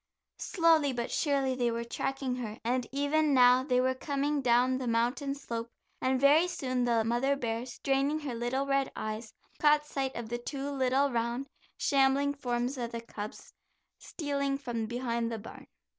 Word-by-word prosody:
Slowly 325 -5 +3
but 240 0 -3
surely 275 -3 +1
they 245 -2 0
were 235 0 -2
tracking 260 +2 -3
her 220 -3 -5
and 245 +1 0
even 285 +1 +2
now 250 0 +6
they 250 -2 +2
were 260 +1 +2
coming 285 +2 -1
down 250 +1 +3
the 255 - -3
mountain 245 +5 0
slope, 235 -4 -5 0.3
and 260 0 +1
very 295 +6 +5
soon 255 -8 -1
the 230 -2 +2
mother 240 +5 +1
bear, 235 -2 -3
straining 275 +4 0
her 280 -4 -4
little 240 +4 -1
red 275 -1 +1
eyes, 215 +1 -5 0.3
caught 300 0 +4
sight 270 -3 -3
of 235 -2 -5
the 240 +1 -3
two 275 +3 -4
little 270 +1 +2
round 235 +3 -2 0.3
shambling 275 +1 +3
forms 250 -1 -2
of 235 -1 -3
the 230 - -4
cubs, 210 -2 -8 0.5
stealing 280 -3 -2
from 240 -5 -3
behind 235 -1 -2
the 225 - -3
barn. 220 - -11
260 Hz, 170 wpm, -30 LUFS, 235-280 Hz, 0.5 s, now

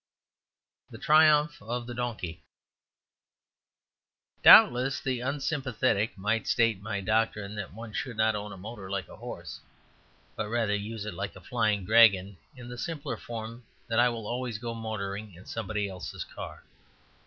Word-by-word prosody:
The - - -10
Triumph 150 -1 +4
of 120 +3 -4
the 120 - -6
Donkey 115 -9 -4 2.0
Doubtless 130 +3 +8
the 130 -2 -2
unsympathetic 130 -5 -1
might 105 +4 -1
state 115 -5 +2
my 105 -1 -3
doctrine 105 -1 0
that 100 -3 -5
one 110 +1 -9
should 120 -1 -4
not 110 0 +3
own 105 0 -5
a - - -9
motor 100 0 -8
like 95 -3 -3
a - - -13
horse, - - -8 0.8
but 110 -1 -3
rather 115 -2 +1
use 105 +1 -4
it 105 - -5
like 100 +3 -5
a - - -10
flying 105 -1 0
dragon 100 -3 +5 0.2
in 125 -2 -10
the 125 0 -8
simpler 160 -2 -4
form 115 +1 -7 0.2
that 115 - +1
I 125 +1 +5
will 115 -2 -5
always 120 0 -3
go 115 +1 -5
motoring 105 -3 -5
in 90 - -14
somebody 105 -2 -3
else's 95 -2 -6
car. - - -9
110 Hz, 155 wpm, -28 LUFS, 100-120 Hz, 2.0 s, Doubtless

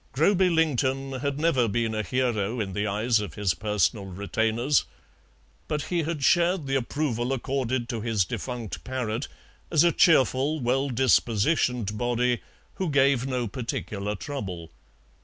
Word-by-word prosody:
Groby 185 +6 +3
Lington 135 -5 +1
had 140 +1 -2
never 140 -7 +2
been 115 +1 -1
a 110 - -1
hero 115 0 -1
in 100 -3 -3
the 105 +2 -1
eyes 110 +3 +1
of 100 -7 -6
his 100 -4 +1
personal 105 -1 0
retainers, 110 +8 0 0.8
but 150 -2 -2
he 170 - +2
had 155 -2 -3
shared 175 +1 +3
the 135 - -3
approval 130 -2 -1
accorded 130 -2 -1
to 115 -2 -3
his 110 -4 +1
defunct 120 +1 -5
parrot 125 -1 -3 0.4
as 155 -1 +4
a 170 - +4
cheerful, 150 -2 +3
well 135 +2 0
dispositioned 120 -2 +1
body, 120 0 +1 0.4
who 185 -3 -1
gave 135 -2 +3
no 125 -3 -1
particular 105 -3 -4
trouble. 95 - -6
125 Hz, 140 wpm, -26 LUFS, 110-140 Hz, 0.8 s, as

